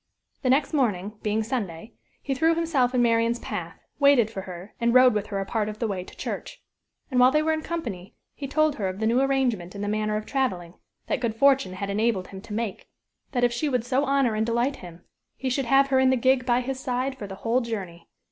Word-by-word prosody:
The 255 - 0
next 275 +4 +2
morning 210 -7 0
being 215 +1 0
Sunday, 215 -4 -4 0.3
he 275 - -1
threw 320 +5 +2
himself 280 -7 +1
in 245 - +4
Marian's 230 0 +2
path, - - -6 0.2
waited 280 -6 +5
for 195 - -5
her, 185 +2 -9
and 235 +1 +2
rode 255 -1 +7
with 210 -1 -2
her 200 -2 -3
a 195 - -2
part 215 0 -1
of 210 - -7
the 230 - -2
way 190 -3 -3
to - - -15
church. - - -5 0.5
And 250 - +2
while 250 +1 +7
they 305 +3 +2
were 320 0 +2
in 315 - -2
company, 230 - -5 0.2
he 280 - -6
told 310 +1 +1
her 200 - -1
of 185 0 -4
the 220 - 0
new 235 +4 +3
arrangement 250 -10 0
in 200 - -5
the - - -2
manner 215 0 0
of 215 - -5
traveling, 185 -12 -2 0.3
that 295 - -1
good 235 -3 -2
fortune 270 -5 +3
had 200 +2 -4
enabled 210 -2 0
him 190 -1 -9
to 210 - -9
make 220 -2 -4 0.4
that 245 -2 0
if 240 -1 +3
she 290 +5 -1
would 250 -4 0
so 260 +2 +1
honor 275 -4 +2
and 215 +1 0
delight 240 +4 0
him, 175 -1 -12 0.3
he 260 -1 -2
should 270 +1 0
have 275 +3 +4
her 265 -1 +3
in 260 0 +4
the 260 - +4
gig 255 +1 +2
by 245 0 +3
his 260 +1 -4
side 260 +1 -2
for 210 -6 -7
the 195 - -7
whole 235 +5 0
journey. 190 -8 -6
235 Hz, 240 wpm, -25 LUFS, 210-265 Hz, 0.5 s, rode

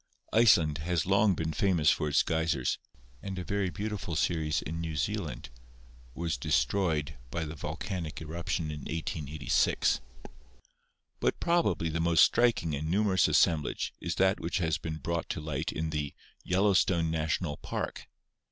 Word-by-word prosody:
Iceland 85 -10 +5
has 85 +1 0
long 100 +1 +3
been 80 -1 -2
famous 85 -4 +3
for 75 - 0
its 70 - +4
geysers, 80 -5 0 0.4
and 95 -1 -5
a 90 - -3
very 100 0 -1
beautiful 100 -3 -4
series 80 -2 0
in 85 +1 -4
New 80 -2 -4
Zealand 75 - -3 0.6
was 85 -4 -2
destroyed 75 +2 0
by 85 +3 -3
the 75 - -6
vol 75 0 -5
canic 90 -7 -4
eruption 80 0 -3
in 75 - -5
1886. 75 -2 0 1.2
But - - 0
probably 160 - +1
the 80 +1 -2
most 85 0 +5
striking 115 -10 +3
and 75 +2 -2
numerous 95 -1 +3
assemblage 80 -4 +2
is - - -2
that 95 0 +3
which 85 - -2
has 80 -4 0
been 80 -2 -4
brought 85 +3 -3
to - - -2
light 75 -3 -3
in 80 0 -3
the 75 -2 -3 0.3
"Yellowstone 90 -3 +2
National 80 -1 -1
Park." - - -5
80 Hz, 150 wpm, -30 LUFS, 75-95 Hz, 1.2 s, Iceland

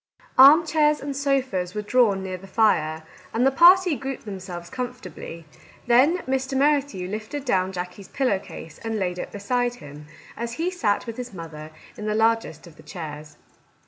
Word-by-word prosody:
Armchairs 300 +1 +6
and 280 0 -5
sofas 260 -10 -1
were 210 - -2
drawn 210 -4 +2
near 185 -1 -4
the 195 - -13
fire, 160 -7 +1 0.3
and 240 +3 +2
the 270 - +4
party 350 +3 +6
grouped 270 -2 -6
themselves 185 -4 -7
com 250 +6 -4
fortably; 170 -8 -10 0.4
then 260 +8 +4
Mr. 265 0 -1
Merrithew 280 -9 +1
lifted 215 +8 -5
down 190 -6 +1
Jackie's 180 +1 -7
pillow 255 -8 0
case 160 -4 -11
and 225 -1 -3
laid 180 -3 -2
it - - -6
beside 245 +4 -1
him, 150 -4 -12 0.3
as 235 0 -4
he 335 +8 -2
sat 215 - 0
with 230 -1 -7
his 245 -5 -7
mother 155 -2 -8 0.3
in 210 - -5
the 210 - 0
largest 225 -7 +1
of 165 -3 -15
the - - -14
chairs. 155 -4 -8
220 Hz, 175 wpm, -24 LUFS, 180-270 Hz, 0.4 s, Armchairs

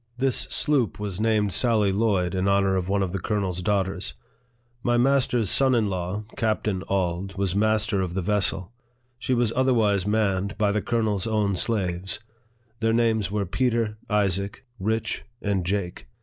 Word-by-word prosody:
This 130 -1 0
sloop 140 -9 +1
was 105 -1 -4
named 105 -3 +1
Sally 110 -5 +3
Lloyd, 95 -4 +1
in 95 +1 0
honor 100 -1 +3
of 95 0 -2
one 100 0 +2
of 90 - -2
the 95 - -2
colonel's 95 -2 -2
daughters. 95 -5 -1 0.7
My 120 0 +1
master's 125 -3 +2
son 135 -2 +3
in 110 -4 +1
law, 90 +3 -3
Captain 110 -3 -1
Auld, 95 0 -1
was 95 -1 0
master 110 -1 +1
of 90 -1 -3
the 95 - 0
vessel; 100 0 0 0.5
she 130 - 0
was 120 -2 +1
otherwise 110 -7 +2
manned 100 -2 0
by 105 -1 +2
the 105 0 0
colonel's 110 -4 0
own 105 -3 +1
slaves. 95 -3 -1 0.6
Their 115 0 +1
names 115 -3 +2
were 100 0 -1
Peter, 115 +1 0
Isaac, 100 +3 0
Rich, 110 +3 -1 0.2
and 100 -4 -1
Jake. 90 -5 -3
105 Hz, 160 wpm, -25 LUFS, 95-115 Hz, 0.7 s, Sally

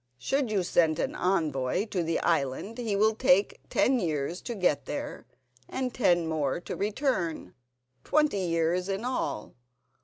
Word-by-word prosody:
Should 270 - 0
you 200 -4 +1
send 165 -3 +2
an - - -1
envoy 160 -2 0
to 185 - -1
the 165 0 0
island 165 - -1
he 225 -4 -1
will 215 +2 +4
take 250 -2 +3
ten 260 0 +3
years 160 -1 -2
to 240 - -5
get 150 -8 +1
there 145 - -5 0.4
and 255 -2 -2
ten 175 -8 +3
more 155 -2 -1
to - - -5
return—twenty 165 - -2
years 175 +1 0
in 195 +4 -2
all. 250 - -3
180 Hz, 145 wpm, -28 LUFS, 150-215 Hz, 0.4 s, will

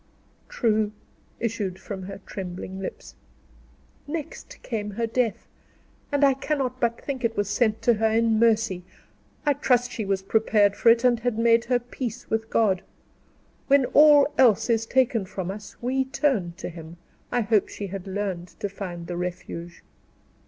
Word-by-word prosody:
"True," 220 - +1 0.5
issued 210 -5 -2
from 195 -1 -7
her 195 +1 -7
trembling 190 0 -6
lips. 195 - -7 0.9
"Next 330 - -6
came 210 -4 -3
her 225 +3 -2
death; 230 -1 -1 0.6
and 285 0 +1
I 275 -1 +6
cannot 265 -2 -2
but 235 -2 0
think 270 -3 -5
it 230 -1 0
was 205 -1 +1
sent 215 +1 +1
to 240 - +5
her 220 0 +1
in 225 0 +2
mercy. 220 -5 +2 0.6
I 290 - +4
trust 250 -3 +1
she 220 - -3
was 195 -1 -1
prepared 205 -1 +3
for 230 - +4
it, 230 +1 +5
and 245 -2 +4
had 235 -1 -1
made 230 0 +4
her 250 0 +2
peace 245 0 -6
with 225 0 -1
God. 195 -5 +2 0.9
When 280 -1 +5
all 295 -1 +7
else 240 -2 +5
is 225 0 +1
taken 245 -4 +2
from 190 0 -5
us, 205 0 -9
we 260 +2 +1
turn 260 - 0
to - - -5
him; 165 0 -10 0.3
I 245 - +2
hope 215 -2 +2
she 205 - -6
had 195 0 -6
learned 190 -3 -3
to 205 - -2
find 180 -4 -6
the 175 0 -5
Refuge." 175 -1 -6
225 Hz, 165 wpm, -25 LUFS, 195-245 Hz, 0.9 s, all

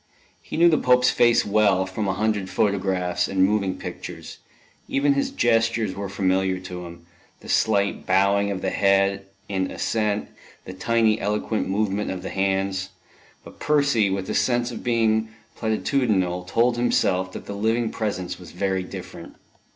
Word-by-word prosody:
He - - -7
knew 170 +1 +6
the 155 -3 +4
Pope's 125 0 +4
face 120 -1 +3
well, 100 -3 +3
from 95 +2 -3
a 95 - 0
hundred 105 -2 -1
photographs 95 -4 0
and 95 -1 +1
moving 100 -2 0
pictures; - - -8 0.5
even 140 +1 +2
his 140 - 0
gestures 115 -3 +1
were 100 +1 -5
familiar 95 -1 0
to 90 -1 -7
him, 85 0 -13 0.4
the - - -13
slight 100 -2 +1
bowing 100 +2 +3
of 95 -2 -4
the 95 - 0
head 100 0 +2 0.2
in 95 -2 -1
assent, 105 -2 -1 0.4
the 90 - -7
tiny 110 +2 +1
eloquent 105 0 -1
movement 105 +1 -1
of 90 -1 -5
the - - -5
hands; 95 0 -1 0.5
but - - -14
Percy, 140 -8 +2
with 95 -1 -3
a - - -2
sense 120 -1 +1
of - - -7
being 110 -2 +1 0.3
platitudinal, 110 -6 0
told 120 +4 +2
himself 95 -6 +1
that - - -8
the - - -6
living 110 +3 0
presence 100 -5 -3
was 90 - -12
very 95 +1 -1
different. 90 - -9
100 Hz, 160 wpm, -23 LUFS, 95-115 Hz, 0.5 s, knew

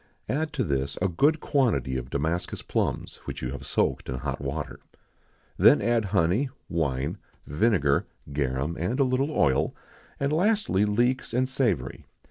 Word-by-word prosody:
Add 155 +3 -1
to 140 -4 0
this 70 - -1
a 95 - +2
good 145 - +2
quantity 110 - +1
of 65 -1 -4
Damascus 80 +6 -2
plums, - - -2
which - - -6
you 60 - -2
have 70 - -7
soaked - - 0
in 65 - -2
hot 70 +1 -4
water. 70 0 -4 0.8
Then - - +7
add 115 0 +1
honey, 100 +7 +2 0.2
wine, 75 +1 -1 0.3
vinegar, 75 -4 +2 0.3
garum, 70 +3 -1
and 95 - -1
a - - +6
little 130 +2 +1
oil; 70 - +2 0.4
and, 140 +2 0
lastly, 180 - +2
leeks 120 +4 +1
and 130 +1 +2
savory. 115 - -1
90 Hz, 150 wpm, -27 LUFS, -, 0.8 s, Then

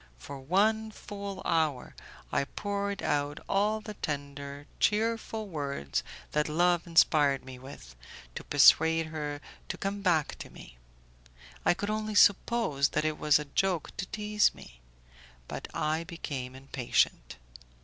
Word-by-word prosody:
For 135 - -9
one 215 +9 +2
full 200 -2 -7
hour 155 -5 0 0.4
I 140 - +1
poured 200 +4 -3
out 145 0 0
all 210 +2 +1
the 215 0 -7
tender, 140 -3 -5
cheerful 220 0 0
words 140 - -3 0.3
that 150 0 +1
love 175 +2 +2
inspired 150 -5 +4
me 130 -1 -9
with, 125 - -12 0.4
to - - -6
persuade 160 +3 +5
her 150 -2 -3 0.3
to - - -3
come 200 +1 -3
back 170 -6 +1
to - - -8
me; - - -14 0.8
I - - +4
could 205 +3 -3
only 215 0 -2
suppose 200 -8 +4
that 155 - -1
it 155 -1 -1
was 150 -1 +5
a 150 - -4
joke 175 +3 -1
to 190 - -3
tease 210 0 +1
me. - - -14 0.7
But - - -6
I 155 +2 -1
became 140 -7 -6
impatient. 125 - 0
160 Hz, 140 wpm, -29 LUFS, 140-200 Hz, 0.8 s, persuade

